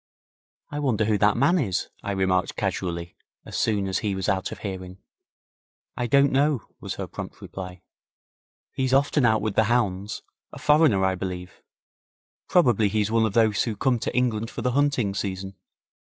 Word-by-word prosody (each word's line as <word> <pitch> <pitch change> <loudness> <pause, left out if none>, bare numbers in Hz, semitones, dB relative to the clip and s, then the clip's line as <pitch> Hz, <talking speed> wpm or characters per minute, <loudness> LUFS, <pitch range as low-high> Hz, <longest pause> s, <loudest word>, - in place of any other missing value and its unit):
'I 145 - -3
wonder 115 -7 +1
who 105 -1 +1
that 105 +1 +3
man 150 +8 +3
is?' 100 - -1
I 100 - -3
remarked 95 -1 +1
casually, 85 -1 -3 0.3
as - - -8
soon 100 -3 +1
as 95 - 0
he 105 -3 -1
was 95 -1 -3
out 95 -1 0
of - - -6
hearing. 95 -1 -6 1.0
'I 125 - -2
don't 140 +3 +4
know,' 140 -1 +2 0.2
was - - -5
her - - -4
prompt - - -8
reply. 90 -1 -8 0.9
'He's 130 0 +1
often 140 -1 +3
out 110 -1 +2
with 110 -2 -1
the 110 - +3
hounds 105 -2 -1 0.3
a - - -10
foreigner, 150 -11 +4
I 95 - +2
believe. 90 -1 -6 0.9
Probably 120 - +4
he's 105 +1 0
one 115 -1 +3
of 105 - -5
those 110 -3 +3
who 115 -3 -2
come 125 +1 +1
to - - -3
England 115 -3 +1
for - - -6
the 125 - +1
hunting 135 -6 +1
season. 95 -1 -4
110 Hz, 175 wpm, -25 LUFS, 95-125 Hz, 1.0 s, don't